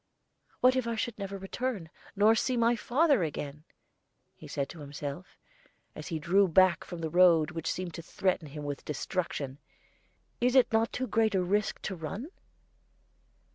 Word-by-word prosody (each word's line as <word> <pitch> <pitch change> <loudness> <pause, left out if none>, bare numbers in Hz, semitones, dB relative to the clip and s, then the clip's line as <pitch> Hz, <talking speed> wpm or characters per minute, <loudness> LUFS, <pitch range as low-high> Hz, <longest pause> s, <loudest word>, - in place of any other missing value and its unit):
"What 255 +1 +5
if 255 -2 0
I 230 - -1
should 225 0 -3
never 195 0 -4
return, 195 -3 -4 0.2
nor 210 +2 +5
see 250 +2 0
my 235 +1 +3
father 275 - +2
again?" 150 -1 -4 0.8
said 140 - -2
he - - -12
to 170 - -12
himself, 145 +3 -7 0.6
as 155 - -8
he 165 -3 -2
drew 190 +6 +3
back 185 0 +4
from 175 -2 -8
the 160 - -2
road 175 -2 +5
which 165 -2 -3
seemed 180 -2 -4
to 170 - -6
threaten 180 -1 -1
him 150 +1 -8
with 145 -1 -5
destruction. 150 -3 -3 0.8
"Is 245 +2 +2
it 255 -3 +5
not 225 +1 +2
too 255 - -2
great 220 -2 +1
a 185 - +2
risk 205 +4 0
to 190 - -3
run?" 190 - -6
185 Hz, 170 wpm, -30 LUFS, 160-225 Hz, 0.8 s, What